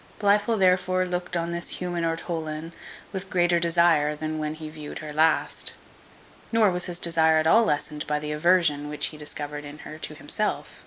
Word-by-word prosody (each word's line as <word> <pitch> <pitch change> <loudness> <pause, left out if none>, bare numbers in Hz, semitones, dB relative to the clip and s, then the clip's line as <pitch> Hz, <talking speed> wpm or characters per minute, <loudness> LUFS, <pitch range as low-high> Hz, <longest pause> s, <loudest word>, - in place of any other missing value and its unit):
Blifil 210 +2 +3
therefore 185 -1 +3
looked 180 -1 -3
on 170 0 -2
this 170 0 -2
human 175 -1 -3
ortolan 165 -1 -3 0.4
with 190 -1 -5
greater 175 -1 +2
desire 165 -3 +3
than 155 +1 -4
when 155 0 -3
he 155 0 -8
viewed 155 -1 -8
her 150 -1 -7
last; 155 +1 +1 0.8
nor 225 -4 +4
was 180 0 -1
his 175 -1 -3
desire 160 -2 +3
at 155 - +2
all 225 +8 +5
lessened 150 -2 -1
by 150 - 0
the 150 0 -4
aversion 150 -2 +2
which 150 - 0
he 155 - -11
discovered 150 0 -5
in 145 +1 -9
her 155 - -9
to - - -5
himself. - - -3
165 Hz, 180 wpm, -25 LUFS, 150-180 Hz, 0.8 s, all